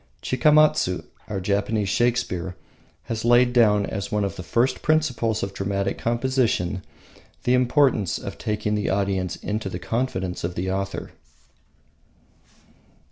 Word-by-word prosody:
Chikamatsu, 150 - +3 0.2
our 100 - -3
Japanese 100 +2 0
Shakespeare, 105 -6 0 0.5
has 110 -1 -4
laid 120 +1 +4
down 105 -4 +4
as 100 -2 -4
one 105 -1 +1
of 100 - -2
the - - -6
first 120 +8 0
principles 130 -8 +1
of 95 - -4
dramatic 100 0 -2
composition 115 -6 0 0.6
the 125 - +2
importance 125 - +3
of 100 0 -7
taking 105 -1 -1
the 105 -1 0
audience 95 -2 0
into 105 -1 -3
the 90 - -4
confidence 115 -4 -2
of 85 +1 -3
the 95 +1 -2
author. 100 +1 -3
105 Hz, 130 wpm, -24 LUFS, 95-120 Hz, 0.6 s, laid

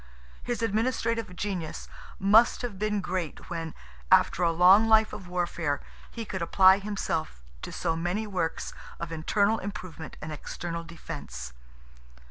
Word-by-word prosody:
His 240 -1 -3
administrative 230 -2 0
genius 180 -5 -4 0.3
must 215 +6 +5
have 215 -6 -4
been 210 -1 0
great 180 -2 -4
when, 165 -2 -4 0.4
after 180 - +5
a 170 -1 +4
long 185 +6 +6
life 220 0 +5
of 185 - -7
warfare, 175 -4 -1 0.3
he 230 -1 -6
could 190 -3 -4
apply 190 +3 +6
himself 195 - -3 0.2
to - - -6
so 165 - -1
many 175 +6 -1
works 180 -6 -2 0.3
of 170 -1 -5
internal 200 +7 +1
improvement 185 -6 -7
and 155 - -6
external 170 +2 -5
defence. 145 - -8
185 Hz, 135 wpm, -28 LUFS, 165-210 Hz, 0.4 s, long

